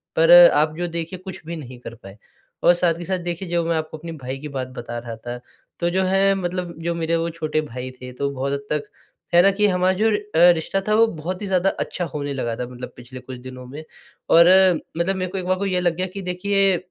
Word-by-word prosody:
पर 165 Hz, +1 st, +4 dB, 0.2 s
आप 155 Hz, +1 st, +2 dB
जो 175 Hz, 0 st, -2 dB
देखिए 170 Hz, +2 st, -5 dB
कुछ 185 Hz, 0 st, -9 dB
भी 170 Hz, +1 st, -5 dB
नहीं 130 Hz, -6 st, -9 dB
कर 120 Hz, -1 st, -9 dB
पाए। 95 Hz, -3 st, -14 dB, 0.5 s
और 175 Hz, -, +7 dB
साथ 170 Hz, -1 st, +1 dB
ही 175 Hz, -, -6 dB
साथ 190 Hz, +1 st, -1 dB
देखिए 175 Hz, +1 st, -4 dB
जो 170 Hz, 0 st, +1 dB
मैं 165 Hz, -, 0 dB
आपको 155 Hz, 0 st, -5 dB
अपने 165 Hz, +2 st, -8 dB
भाई 130 Hz, +2 st, -4 dB
की 150 Hz, -, -7 dB
बात 135 Hz, -3 st, -4 dB
बता 120 Hz, 0 st, -5 dB
रहा 115 Hz, -1 st, -7 dB
था, 120 Hz, +2 st, -7 dB, 0.4 s
तो 170 Hz, 0 st, +1 dB
जो 190 Hz, +2 st, +1 dB
है 195 Hz, +1 st, +3 dB
मतलब 180 Hz, -2 st, -3 dB
जो 170 Hz, 0 st, -1 dB
मेरे 165 Hz, 0 st, 0 dB
वो 165 Hz, 0 st, -1 dB
छोटे 155 Hz, -2 st, -2 dB
भाई 130 Hz, -3 st, -7 dB
थे 125 Hz, -, -8 dB
तो 140 Hz, +2 st, -2 dB
बहुत 140 Hz, +1 st, -3 dB
हद 140 Hz, 0 st, -4 dB
तक 150 Hz, -1 st, 0 dB, 0.5 s
है 175 Hz, -, +7 dB
ना? 195 Hz, -, +6 dB
कि 210 Hz, +2 st, +1 dB
हमारा 185 Hz, -1 st, +2 dB
जो 215 Hz, +4 st, +2 dB
अ, 210 Hz, -, +2 dB, 0.4 s
रिश्ता 165 Hz, +4 st, -2 dB
था 215 Hz, -, +2 dB
वो 225 Hz, -, +6 dB
बहुत 180 Hz, +1 st, -5 dB
ही 205 Hz, -, -4 dB
ज़्यादा 190 Hz, 0 st, +2 dB
अच्छा 180 Hz, -, -2 dB
होने 145 Hz, -2 st, -3 dB
लगा 120 Hz, -4 st, -2 dB
था 125 Hz, -, -4 dB
मतलब 125 Hz, 0 st, -9 dB
पिछले 125 Hz, +1 st, -10 dB
कुछ 125 Hz, 0 st, -9 dB
दिनों 130 Hz, 0 st, -10 dB
में, 145 Hz, +5 st, -9 dB, 0.5 s
और 170 Hz, +1 st, +7 dB, 0.5 s
मतलब 185 Hz, +3 st, 0 dB
मेरे 185 Hz, -1 st, -3 dB
को 195 Hz, -, -4 dB
एक 185 Hz, -, -4 dB
बार 185 Hz, 0 st, +1 dB
को 200 Hz, -, -2 dB
ये 185 Hz, -2 st, +1 dB
लग 175 Hz, -2 st, +1 dB
गया 185 Hz, +1 st, -2 dB
कि 195 Hz, -, -5 dB
देखिए 190 Hz, +1 st, +1 dB
170 Hz, 250 wpm, -22 LUFS, 140-185 Hz, 0.5 s, और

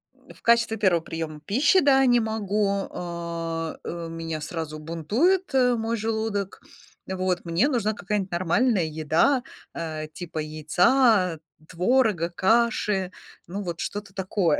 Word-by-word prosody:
М. -, -, -17 dB
В -, -, -22 dB
качестве 235 Hz, -1 st, +3 dB
первого 185 Hz, -5 st, +3 dB
приёма 160 Hz, -2 st, -5 dB
пищи, 285 Hz, -, +4 dB
да, 270 Hz, -1 st, +5 dB
не 245 Hz, -1 st, +5 dB
могу. 215 Hz, -2 st, 0 dB, 0.2 s
А, 170 Hz, -2 st, -4 dB
э, 170 Hz, -1 st, -5 dB
меня 165 Hz, -1 st, -5 dB
сразу 155 Hz, 0 st, -5 dB
бунтует, 220 Hz, -, 0 dB
э, 250 Hz, -2 st, +4 dB
мой 230 Hz, 0 st, -2 dB
желудок. 220 Hz, -2 st, -2 dB, 0.5 s
Вот 185 Hz, -1 st, -1 dB
мне 170 Hz, +11 st, +2 dB
нужна 225 Hz, -6 st, 0 dB
какая-нибудь 200 Hz, -2 st, -3 dB
нормальная 185 Hz, +3 st, +2 dB
еда, 160 Hz, -, +1 dB, 0.3 s
э, 155 Hz, -2 st, -4 dB
типа 165 Hz, -1 st, -6 dB
яйца, 180 Hz, -, +2 dB, 0.3 s
творога, 185 Hz, -1 st, +2 dB
каши. 200 Hz, 0 st, +1 dB, 0.4 s
Ну, 195 Hz, +4 st, -5 dB
вот 170 Hz, -3 st, -5 dB
что-то 200 Hz, -1 st, -5 dB
такое, 190 Hz, -4 st, 0 dB
190 Hz, 130 wpm, -25 LUFS, 165-225 Hz, 0.5 s, да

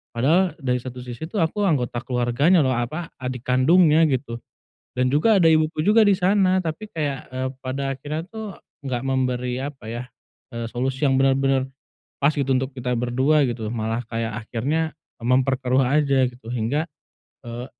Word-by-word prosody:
Padahal, 165 Hz, +9 st, +3 dB
dari 125 Hz, -3 st, 0 dB
satu 125 Hz, -1 st, -7 dB
sisi 125 Hz, +3 st, -8 dB
itu 210 Hz, -, -6 dB
aku 180 Hz, +5 st, 0 dB
anggota 125 Hz, -6 st, 0 dB
keluarganya 125 Hz, +8 st, +2 dB
loh, 130 Hz, -, +2 dB
apa, 155 Hz, +8 st, -3 dB, 0.2 s
adik 125 Hz, -1 st, -4 dB
kandungnya 155 Hz, +5 st, +5 dB
gitu. 120 Hz, -2 st, -2 dB, 0.6 s
Dan 125 Hz, 0 st, +2 dB
juga 195 Hz, +7 st, +4 dB
ada 165 Hz, -, +5 dB
ibuku 155 Hz, 0 st, +2 dB
juga 215 Hz, +3 st, +5 dB
di 200 Hz, -, +5 dB
sana. 190 Hz, 0 st, +3 dB
Tapi 165 Hz, +5 st, -5 dB
kayak, 145 Hz, -5 st, -2 dB
eee, 130 Hz, 0 st, -2 dB, 0.2 s
pada 135 Hz, +1 st, -2 dB
akhirnya 150 Hz, +4 st, -4 dB
tuh 220 Hz, -4 st, -7 dB, 0.3 s
nggak 125 Hz, -2 st, -2 dB
memberi, 125 Hz, -2 st, -1 dB
apa 140 Hz, -4 st, -8 dB
ya, 120 Hz, +1 st, -4 dB, 0.5 s
eee, 115 Hz, 0 st, -3 dB
solusi 130 Hz, +4 st, -2 dB
yang 135 Hz, -, +2 dB
benar-benar 135 Hz, 0 st, +2 dB, 0.6 s
pas 145 Hz, -, +5 dB
gitu 140 Hz, -2 st, -1 dB
untuk 130 Hz, +1 st, -1 dB
kita 125 Hz, -1 st, -2 dB
berdua 130 Hz, +5 st, +2 dB
gitu, 115 Hz, -2 st, -4 dB
malah 115 Hz, +1 st, -2 dB
kayak 115 Hz, -1 st, -4 dB
akhirnya 155 Hz, +7 st, -1 dB, 0.3 s
memperkeruh 130 Hz, +1 st, +2 dB
aja 135 Hz, -1 st, +2 dB
gitu. 120 Hz, -2 st, -12 dB
Hingga, 125 Hz, +6 st, 0 dB, 0.6 s
eee, 120 Hz, +1 st, -6 dB
130 Hz, 160 wpm, -23 LUFS, 125-155 Hz, 0.6 s, kandungnya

